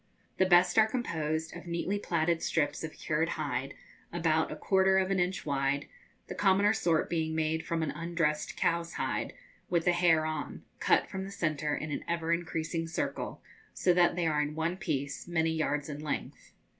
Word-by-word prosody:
The 190 - +5
best 180 +4 +5
are 220 - +6
composed 160 -9 -2
of 175 +1 -9
neatly 170 +4 -1
plaited 170 -3 0
strips 155 -1 0
of 160 - -5
cured 160 +2 -1
hide, 135 -3 -3 0.4
about 160 -2 +1
a - - -4
quarter 190 0 +3
of 190 0 +1
an 195 - +2
inch 180 +1 -1
wide, 140 0 0 0.4
the - - -6
commoner 200 +1 +4
sort 165 -6 +1
being 160 -1 -1
made 160 0 0
from 165 -1 -1
an 155 - -1
undressed 165 -2 -1
cow's 170 0 0
hide, 130 - -2 0.4
with 170 -2 +1
the 180 - +5
hair 175 -3 +3
on, 155 -1 -4 0.2
cut - - +3
from 190 0 -5
the 195 - -6
centre 155 -6 -1
in 155 - -4
an - - -3
ever 170 0 0
increasing 165 -1 -2
circle, 165 - -3 0.3
so 180 - +3
that 175 -1 +4
they 175 -2 0
are 150 -2 +2
in 150 +1 -3
one 160 +2 -1
piece, 145 -6 -3
many 165 -2 +1
yards 150 -2 -1
in 145 -1 -6
length. 150 -2 -5
165 Hz, 185 wpm, -30 LUFS, 155-175 Hz, 0.4 s, are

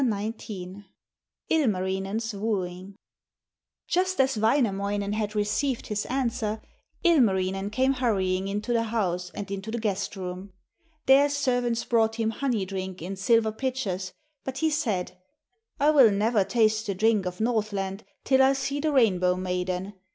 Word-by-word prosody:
ILMARINEN'S 205 -4 0
WOOING 195 -2 -3 0.9
Just 370 0 0
as 265 -1 +3
Wainamoinen 205 -3 +1
had 210 0 -2
received 220 +5 0
his 210 -1 -3
answer, 235 -4 -1 0.4
Ilmarinen 195 - +2
came 260 +5 +2
hurrying 195 -7 0
into 210 +4 -2
the 230 -1 +1
house 180 -6 -1
and 200 -1 -6
into 200 +2 -5
the 235 - -2
guest 210 -3 -2
room. 185 +1 -6 0.5
There 275 +2 +6
servants 245 -4 0
brought 225 -2 +2
him 225 -1 0
honey 230 -5 -1
drink 190 -1 -5
in 190 +3 -4
silver 220 +3 +2
pitchers, 215 -7 -3 0.3
but 265 0 -5
he 315 +2 +1
said: 210 - -2 0.6
'I 295 +2 +5
will 270 -7 +7
never 210 +1 +2
taste 215 +2 +1
the 200 - -1
drink 210 -1 +2
of 180 0 -6
Northland 215 -3 -1 0.2
till 265 -1 +4
I 265 +1 +5
see 275 +1 -2
the 310 +1 0
Rainbow 185 -9 +3
maiden. 180 +1 -3
215 Hz, 135 wpm, -26 LUFS, 190-245 Hz, 0.9 s, will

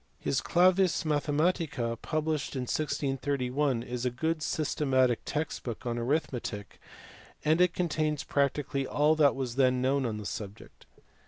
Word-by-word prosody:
His 135 - -1
Clams 185 +1 +3
Mathematica 150 -4 0
published 155 -2 -2
in 130 - -1
1631 135 -2 -1
is 125 0 -5
a 125 - +2
good 160 +6 -1
sys 155 -1 -2
tematic 130 -4 +3
text 150 +1 -3
book 120 0 -6
on 120 -1 -2
arithmetic, 120 -5 -3 0.7
and 160 +3 +4
it 180 -1 +3
contains 155 -4 0
practically 140 -1 0
all 150 +2 +3
that 145 -3 +5
was 130 -2 -4
then 130 -2 +3
known 130 0 +1
on 110 -2 -3
the 105 - -7
subject. 105 +1 -8
140 Hz, 145 wpm, -29 LUFS, 125-155 Hz, 0.7 s, that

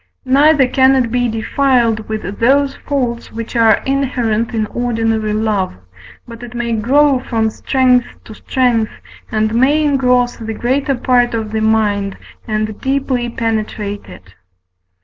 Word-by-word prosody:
neither 280 +1 +4
can 265 +1 +4
it 245 -4 +1
be 245 0 +1
defiled 230 -1 0
with 215 -2 -5
those 275 +3 +2
faults 245 -4 -3
which 230 +1 -7
are 225 -2 +4
inherent 245 -5 -1
in 220 -2 -1
ordinary 225 -2 -1
love; 210 - -1 0.5
but 230 0 -10
it 245 0 -9
may 235 0 -2
grow 265 +5 +3
from 225 -3 -1
strength 250 0 +2 0.2
to 220 - -11
strength, 235 -1 0 0.4
and 215 0 0
may 275 +6 +3
engross 250 -3 +2
the 225 -1 -6
greater 270 +4 0
part 245 -1 +1
of 220 -2 -4
the 220 0 -1
mind, 210 -3 0 0.3
and 215 -1 -3
deeply 265 -3 -1
penetrate 215 -3 -3
it. 95 0 -14
235 Hz, 140 wpm, -16 LUFS, 220-260 Hz, 0.5 s, neither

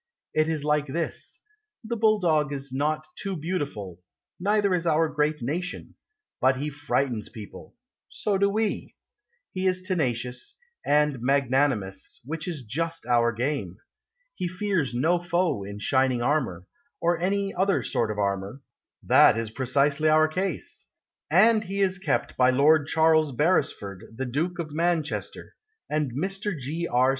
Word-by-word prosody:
It 155 0 +2
is 155 -3 -2
like 150 0 +1
this: 165 +5 -3 0.4
The 230 +1 -3
Bulldog 180 -10 +2
is 140 -2 -6
not 155 +3 0
too 195 -2 -4
beautiful, 145 - -4 0.4
Neither 200 +1 +2
is 175 -1 0
our 160 0 +3
great 150 -2 -1
nation; 175 +8 -4 0.5
But 130 0 +3
he 150 +3 -3
frightens 135 -6 -1
people 110 - -11 0.3
So 200 -2 -1
do 200 0 +4
we; 215 +1 -2 0.6
He 185 0 0
is 185 0 0
tenacious 125 - -2 0.3
And 145 -3 +2
magnanimous 130 -6 0
Which 160 +4 -5
is 160 -7 -4
just 165 +8 -3
our 120 -1 +3
game; 115 - -2 0.6
He 180 - -3
fears 180 -7 -1
no 165 +8 +2
foe 175 - 0
in 100 +1 -7
shining 130 +2 +1
armour, 120 - 0 0.3
Or 170 0 +1
any 195 +2 0
other 195 +2 +1
sort 115 - 0
of 105 - -3
armour 100 +6 -2 0.4
That - - +6
is 115 -1 -3
precisely 140 +5 +1
our 155 0 +5
case; 180 +1 -3 0.4
And 215 +7 +5
he 195 +1 -4
is 190 -1 +1
kept 190 - -1
by 125 0 +5
Lord 145 +3 +4
Charles 160 -2 +3
Beresford, 115 - -1
The 130 - -2
Duke 160 +9 -2
of 165 -3 -4
Manchester, 165 -1 -2 0.4
And 150 -3 0
Mr. 195 - -3
G. 160 +6 -3
R. 125 +2 +3
150 Hz, 145 wpm, -26 LUFS, 130-175 Hz, 0.6 s, That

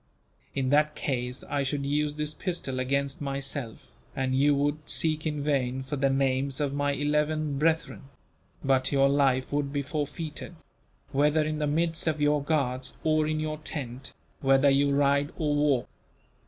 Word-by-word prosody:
In 130 -1 0
that 150 +1 +3
case 125 -2 -3
I 145 - -1
should 140 +1 -1
use 145 +1 0
this 150 0 -1
pistol 160 -9 -3
against 140 +2 -1
myself, 135 -3 -4 0.2
and 130 -1 -1
you 140 +2 +4
would 145 +2 -1
seek 155 -1 +1
in 150 -2 -2
vain 130 -3 0
for 140 +3 -4
the 135 0 +2
names 135 0 0
of 145 -2 -1
my 145 0 0
eleven 150 0 0
brethren; 160 -2 0 0.6
but 135 -1 +2
your 135 -1 +4
life 135 -2 +2
would 145 -1 0
be 140 0 -1
forfeited 150 +3 -4 0.6
whether 150 +3 +3
in 155 0 -2
the 150 - 0
midst 165 +3 +1
of 155 -1 +1
your 145 -1 +2
guards 130 -4 -1
or 155 -1 +2
in 155 0 -1
your 155 0 -3
tent, 135 -4 -6 0.3
whether 135 +1 +4
you 140 +1 +3
ride 140 +1 +2
or 150 -2 0
walk. 145 -4 +2
145 Hz, 165 wpm, -28 LUFS, 135-150 Hz, 0.6 s, you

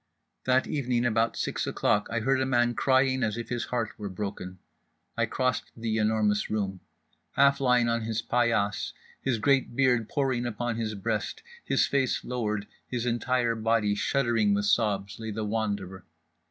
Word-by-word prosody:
That 130 0 +3
evening, 125 -4 0
about 115 0 +1
six - - -2
o'clock, 105 0 +1
I 115 0 -1
heard 135 +3 +2
a - - +2
man 120 -2 +2
crying 130 0 +2
as 110 -1 0
if 120 - -5
his 120 -1 -2
heart 120 -4 -2
were 105 -1 -4
broken. 95 -1 -5 0.6
I - - +1
crossed 130 0 -1
The 115 -1 -1
Enormous 105 -1 +1
Room. 100 -3 -2 0.5
Half 140 0 +4
lying 125 -2 +4
on 115 0 +1
his 110 0 -2
paillasse, 115 -4 +1 0.3
his 130 -3 0
great 130 +1 +2
beard 125 -4 +2
pouring 130 -4 0
upon 120 0 -2
his 110 -2 -2
breast, 105 - -3 0.2
his - - +2
face 135 -3 0
lowered, 105 -5 -2 0.2
his 125 -2 -3
entire 120 0 +1
body 110 -2 +1
shuddering 115 -3 +2
with 100 0 0
sobs, 100 -2 +1
lay 110 -1 -5
The 110 0 -3
Wanderer. 100 -4 -2
115 Hz, 165 wpm, -28 LUFS, 105-125 Hz, 0.6 s, Half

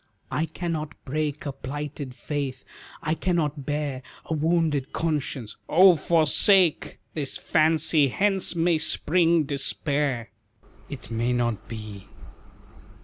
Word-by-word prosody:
"I 160 +2 0
cannot 160 -4 -4
break 150 +1 -2
A 140 - -2
plighted 140 0 -6
faith, 140 -3 -4 0.4
I 155 -1 0
cannot 155 -5 -1
bear 145 -3 -2 0.2
A - - -3
wounded 155 -3 0
conscience." 145 -8 -2
"Oh, 185 +2 +7
forsake 165 +3 +3 0.2
This 145 -4 -4
fancy, 155 -1 +3
hence 195 +5 0
may 165 -1 +2
spring 165 +1 +2
despair." 140 -3 -2 0.6
"It 135 -4 -9
may 115 +2 0
not 120 -4 -1
be." 105 -3 -8
150 Hz, 110 wpm, -25 LUFS, 135-165 Hz, 0.6 s, Oh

